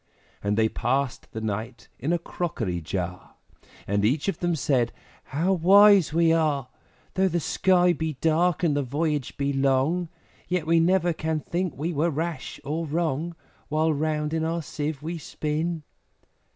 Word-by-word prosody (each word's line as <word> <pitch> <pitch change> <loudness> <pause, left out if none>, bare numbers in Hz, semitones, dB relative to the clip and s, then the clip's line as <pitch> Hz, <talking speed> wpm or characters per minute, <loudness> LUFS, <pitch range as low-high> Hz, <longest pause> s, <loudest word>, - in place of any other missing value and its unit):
And 100 +1 0
they 110 0 +4
passed 130 +3 -1
the 110 - -5
night 110 +3 -4
in 145 +6 -1
a 175 - +3
crockery 115 - -3
jar, 90 +2 -5 0.5
And 100 +1 0
each 135 - +1
of 195 - -1
them 175 -1 0
said, 130 -5 +1 0.4
`How 175 +6 +1
wise 200 0 +7
we 165 +1 +4
are! 150 -5 +1 0.4
Though 190 0 +2
the 175 -1 0
sky 180 +2 +3
be 160 0 -2
dark, 165 +4 +1
and 155 -4 +3
the 145 - +1
voyage 145 +1 -2
be 140 0 0
long, 140 +6 +1 0.4
Yet 180 -3 -1
we 165 +1 +4
never 175 0 +3
can 160 0 -2
think 175 -1 -3
we 165 +5 -2
were 160 +3 +1
rash 165 +2 -4
or 160 +3 -3
wrong, 165 +1 -1 0.3
While 155 +1 +2
round 150 +1 -1
in 160 -1 0
our 165 +1 -1
Sieve 150 -1 -4
we 165 +1 -4
spin!' 155 +2 -3
155 Hz, 165 wpm, -26 LUFS, 140-170 Hz, 0.5 s, wise